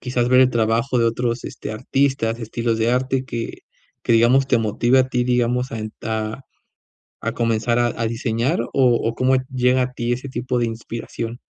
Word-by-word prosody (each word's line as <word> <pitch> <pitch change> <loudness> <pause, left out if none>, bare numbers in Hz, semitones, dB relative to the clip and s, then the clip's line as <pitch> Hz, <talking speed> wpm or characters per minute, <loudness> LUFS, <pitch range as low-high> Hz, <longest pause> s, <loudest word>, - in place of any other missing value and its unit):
quizás, 125 -1 -1
ver 130 0 +6
el 130 -1 +5
trabajo 115 +2 +1
de 115 - +3
otros, 115 +1 -1
este, - - -6
artistas, 120 0 0
estilos 115 0 -2
de 115 +1 +2
arte 130 +1 0
que 115 -3 -5 0.4
que, - - +1
digamos, 120 +4 +4
te 125 -3 +3
motive 115 +4 +2
a 130 0 +3
ti, 125 -1 0
digamos 125 +1 +1
a 115 - -3
ent 110 0 -6
a 110 +3 -3 0.8
a - - -1
comenzar 115 +1 +1
a 120 - +3
a 115 0 -3
diseñar, 115 +5 -1
¿o 120 - -5 0.4
o - - -4
cómo 130 +2 +2 0.2
llega 125 0 +3
a 125 - -1
ti 120 0 -1
ese 130 +3 -6
tipo 125 0 -2
de 120 - +1
inspiración? 115 +1 -6
120 Hz, 195 wpm, -21 LUFS, 115-125 Hz, 0.8 s, ver